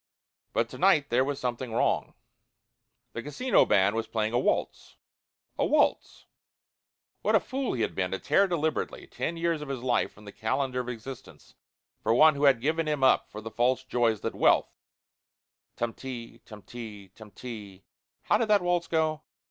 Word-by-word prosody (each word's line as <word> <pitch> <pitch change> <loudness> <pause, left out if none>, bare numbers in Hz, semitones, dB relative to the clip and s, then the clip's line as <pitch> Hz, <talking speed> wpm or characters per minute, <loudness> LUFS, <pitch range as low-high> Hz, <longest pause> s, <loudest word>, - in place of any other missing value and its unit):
But - - +1
to - - -10
night 165 -8 +3
there 125 +2 +4
was 140 0 -3
something 125 0 -3
wrong. - - 0 1.0
The 115 - -4
casino 150 - +2
band 100 +1 +3
was 115 -1 -2
playing 110 0 -1
a 120 - +3
waltz - - -1 0.6
a - - +3
waltz. - - +1 1.0
What - - +2
a - - +6
fool 270 -1 -3
he 115 - -1
had - - -2
been 90 -1 -1
to 95 - -2
tear 175 - +3
deliberately 160 -3 -2
ten 170 - -4
years 165 -2 0
of 150 - -7
his 130 -3 -4
life 125 -2 +1
from 105 - -17
the 100 - -9
calendar 130 +4 -1
of 125 0 -4
existence 125 +2 -9 0.5
for 115 - +2
one 155 +4 +7
who 140 +1 0
had 135 -4 +5
given 160 +4 0
him 150 -3 -1
up 130 - +4
for 105 - -8
the 110 +1 -7
false 125 +3 +1
joys 120 -4 0
that - - -3
wealth - - +3 1.0
"tum 120 -1 -2
ti 125 -3 -8
tum 105 -2 -12
ti 105 -5 -9
tum 110 +2 -14
ti" 105 -5 -9 0.4
how 210 - +2
did 230 - +1
that 205 -3 +4
waltz 175 -1 0
go? 155 -2 0
125 Hz, 180 wpm, -28 LUFS, 115-155 Hz, 1.0 s, one